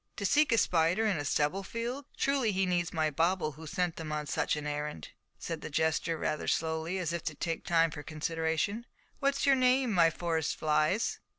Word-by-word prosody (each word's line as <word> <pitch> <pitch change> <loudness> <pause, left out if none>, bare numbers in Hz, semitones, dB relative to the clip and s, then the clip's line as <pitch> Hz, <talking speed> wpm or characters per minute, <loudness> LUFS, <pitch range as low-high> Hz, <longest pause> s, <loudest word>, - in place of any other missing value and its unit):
"To 200 - -4
seek 290 +9 +3
a 230 - +4
spider 175 +3 +2
in 205 -6 +1
a - - -2
stubble 150 +7 +1
field! 235 +7 -4
Truly 275 -5 +1
he 190 0 +1
needs 175 -2 0
my 155 -2 0
bauble 165 +2 +1
who 155 +2 -11
sent 175 +2 -1
them 160 -2 -5
on 150 0 -2
such - - 0
an 150 -1 -5
errand," 150 - -4 0.3
said 165 -2 -5
the - - -6
jester, 160 +2 0
rather 155 - -2
slowly, 160 +3 -1
as 170 -3 -2
if 170 - -3
to 155 - -3
take 165 +3 -3
time 165 -1 +3
for 150 - -7
consideration. 160 +8 -2 0.3
"What's 275 0 +1
your 275 - +6
name, 255 -1 +3
my 175 -4 +5
Forest 165 -1 -1
flies?" 155 +7 +1
165 Hz, 200 wpm, -31 LUFS, 155-200 Hz, 0.3 s, your